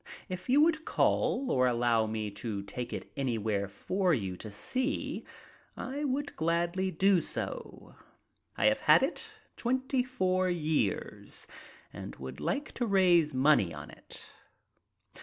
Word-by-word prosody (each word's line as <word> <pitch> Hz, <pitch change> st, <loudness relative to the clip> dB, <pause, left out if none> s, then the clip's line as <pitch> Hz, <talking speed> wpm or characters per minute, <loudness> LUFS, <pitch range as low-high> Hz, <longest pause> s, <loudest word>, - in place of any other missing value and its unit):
If 185 Hz, +5 st, -6 dB
you 275 Hz, +4 st, +6 dB
would 320 Hz, 0 st, +3 dB
call 270 Hz, -3 st, +1 dB
or 130 Hz, -1 st, +4 dB
allow 120 Hz, -2 st, +2 dB
me 110 Hz, -1 st, -3 dB
to 100 Hz, -1 st, -4 dB
take 120 Hz, +4 st, -5 dB
it -, -, -6 dB
anywhere 110 Hz, -7 st, -1 dB
for 180 Hz, -, 0 dB
you 95 Hz, -6 st, -3 dB
to 110 Hz, -, -8 dB
see, 255 Hz, -, -2 dB, 0.5 s
I 285 Hz, +3 st, -3 dB
would 285 Hz, +1 st, -2 dB
gladly 170 Hz, +3 st, 0 dB
do 185 Hz, +1 st, +3 dB
so. 485 Hz, -, -6 dB, 0.6 s
I -, -, +2 dB
have -, -, +4 dB
had -, -, +6 dB
it -, -, -2 dB, 0.3 s
twenty 260 Hz, +2 st, +1 dB
four 185 Hz, -8 st, +1 dB
years, 155 Hz, -, -1 dB, 0.5 s
and -, -, -7 dB
would 65 Hz, -1 st, -8 dB
like 285 Hz, +2 st, -2 dB
to 240 Hz, -, -2 dB
raise 175 Hz, -7 st, +4 dB
money 130 Hz, -, +4 dB
on 75 Hz, +1 st, -8 dB
it." -, -, -9 dB
170 Hz, 140 wpm, -31 LUFS, -, 0.6 s, you